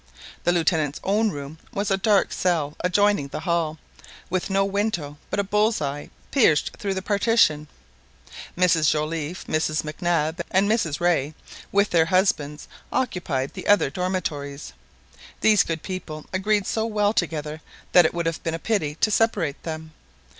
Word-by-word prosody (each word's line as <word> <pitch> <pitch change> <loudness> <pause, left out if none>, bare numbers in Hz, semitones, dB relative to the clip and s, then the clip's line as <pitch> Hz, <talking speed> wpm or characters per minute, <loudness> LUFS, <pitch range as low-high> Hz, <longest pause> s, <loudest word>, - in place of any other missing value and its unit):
The 175 - +4
Lieutenant's 160 -4 +1
own 215 +3 +2
room 145 -2 -7
was 200 0 -1
a - - +4
dark 200 +1 +2
cell 160 -5 0
adjoining 200 -3 +2
the 140 - -6
hall, 165 -2 0 0.5
with 185 +1 -1
no 195 0 +2
window 195 -8 -2
but 200 - -2
a - - +2
bull's 210 +3 +1
eye 145 0 -4 0.2
pierced 190 - +3
through 195 -2 -2
the 190 - -3
partition. 200 -8 +2 0.9
Mrs 165 -4 +4
Joliffe, 155 +2 -2
Mrs 155 0 0
Mac 155 +3 -8
Nab, 170 -1 0
and 195 +2 +3
Mrs 205 -9 0
Rae, 165 -4 +1 0.4
with 200 +1 +2
their 165 -2 +4
husbands, 165 -5 0 0.2
occupied 170 - -1
the - - -7
other 195 -9 +4
dormitories. 150 - -3 0.7
These 215 -3 +5
good 165 -1 -3
people 165 -5 -6
agreed 205 +1 +1
so 220 - -1
well 210 -1 +1
together 155 -5 -2 0.3
that 180 - +7
it 160 - +1
would 170 -1 -1
have 165 -1 -2
been 165 -1 -2
a - - -3
pity 165 -7 -1
to 215 - +3
separate 205 -10 +1
them. 160 -1 -6
175 Hz, 160 wpm, -24 LUFS, 155-200 Hz, 0.9 s, that